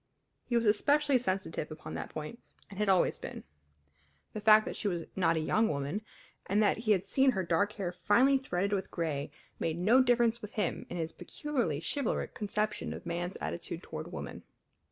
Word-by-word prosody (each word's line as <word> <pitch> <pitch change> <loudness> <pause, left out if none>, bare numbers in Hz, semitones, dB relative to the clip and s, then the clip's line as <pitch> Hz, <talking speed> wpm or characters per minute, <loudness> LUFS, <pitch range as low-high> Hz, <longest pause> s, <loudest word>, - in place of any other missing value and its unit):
He 240 - +2
was 230 - +1
especially 280 +6 +3
sensitive 185 -8 -2
upon 155 0 -8
that - - -5
point, 155 +10 -6 0.3
and 200 - -8
had 210 -1 +1
always 185 -2 +3
been. - - -7 0.9
The 215 - -4
fact 215 0 +7
that - - -4
she 210 - -2
was 175 -4 -1
not 170 -3 +3
a - - +1
young 220 +8 +2
woman, 145 +8 -2 0.5
and 200 - +1
that 205 - +3
he 225 -1 +1
had 190 -1 0
seen 265 +5 +3
her 190 - -1
dark 200 +5 +1
hair 195 -5 -3
finely 265 +9 +4
threaded 200 -5 -1
with 195 -1 -1
gray, 150 -4 -2 0.3
made 165 0 -1
no 220 +9 +5
difference 240 -2 +3
with 210 - -8
him 210 - -2
in 175 - -4
his 165 -1 -2
peculiarly 245 - -2
chivalric 280 - -1
conception 210 0 -2
of - - -9
man's 175 +2 -3
attitude 85 +1 -5
toward - - -7
woman. - - -6
200 Hz, 190 wpm, -31 LUFS, 170-230 Hz, 0.9 s, fact